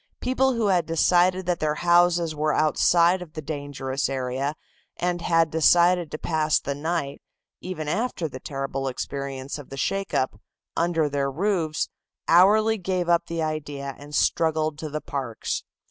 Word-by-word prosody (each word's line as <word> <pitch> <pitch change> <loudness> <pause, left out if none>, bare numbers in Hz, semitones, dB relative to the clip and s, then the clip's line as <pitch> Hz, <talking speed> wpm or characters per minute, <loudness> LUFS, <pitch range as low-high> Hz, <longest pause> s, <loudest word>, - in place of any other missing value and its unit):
People 260 +1 +1
who 230 -2 0
had 180 -3 +2
decided 180 +3 +3
that 180 -1 0
their 150 -1 0
houses 175 -1 +3
were 150 0 0
outside 170 +3 +3
of 165 -4 -10
the 155 - -5
dangerous 140 -2 -3
area 135 +2 -2 0.4
and 175 -1 -1
had 165 -2 +2
decided 175 +1 +4
to 155 - -5
pass 155 -1 +1
the 140 - -3
night, 145 -1 -3 0.4
even 175 -5 -5
after 200 -1 -1
the 130 -3 -9
terrible 135 0 -4
experience 135 +1 -5
of 145 - -11
the 135 - -8
shake 195 +8 -2
up, 130 - -1 0.3
under 165 -2 +1
their 140 -1 -1
roofs, 165 0 -1 0.4
hourly 215 +6 +5
gave 180 -1 -1
up 170 0 +3
the 165 -1 -2
idea 145 -3 -4
and 145 +1 -8
struggled 155 -2 +1
to 155 - -5
the 150 +1 -4
parks. 130 -5 -4
160 Hz, 160 wpm, -25 LUFS, 145-175 Hz, 0.4 s, hourly